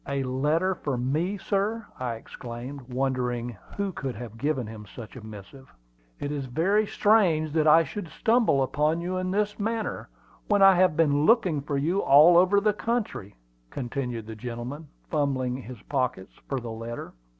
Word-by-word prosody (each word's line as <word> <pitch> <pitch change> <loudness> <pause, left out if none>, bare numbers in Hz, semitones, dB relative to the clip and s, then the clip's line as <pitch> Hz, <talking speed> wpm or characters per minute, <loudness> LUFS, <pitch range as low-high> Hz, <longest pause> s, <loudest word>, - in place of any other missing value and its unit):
"A 140 -1 -1
letter 150 +8 +1
for 140 -7 -3
me, 155 +11 -1
sir!" 205 +3 -1
I 125 -2 -2
exclaimed, 125 +3 -9
wondering 125 -2 -1 0.2
who 200 -1 -1
could 135 -8 -5
have 115 0 -8
given 135 0 -1
him 105 -1 -9
such 110 +1 -10
a 125 - -9
missive. 110 +5 -11 0.5
"It 145 - -3
is 140 -3 -3
very 195 - +1
strange 180 -10 +3
that 155 0 +2
I 165 +2 +7
should 190 +2 -6
stumble 220 - +2
on 155 +3 +2
you 180 +2 -3
in 185 0 -2
this 210 +2 -1
manner, 225 +1 -3 0.4
when 205 -2 +4
I 195 0 +9
have 180 -3 +3
been 150 -2 +3
looking 185 - +3
for 145 0 -2
you 170 +8 +1
all 150 +5 +7
over 185 +3 +5
the 210 +1 +2
country," 215 - -3 0.3
continued 125 - -4
the 110 0 -8
gentleman, 125 +7 -6 0.2
fumbling 135 -5 0
his 125 -2 -9
pockets 125 -9 -2 0.2
for 135 - -1
the 120 -2 -7
letter. 115 +1 -7
145 Hz, 170 wpm, -26 LUFS, 125-185 Hz, 0.5 s, I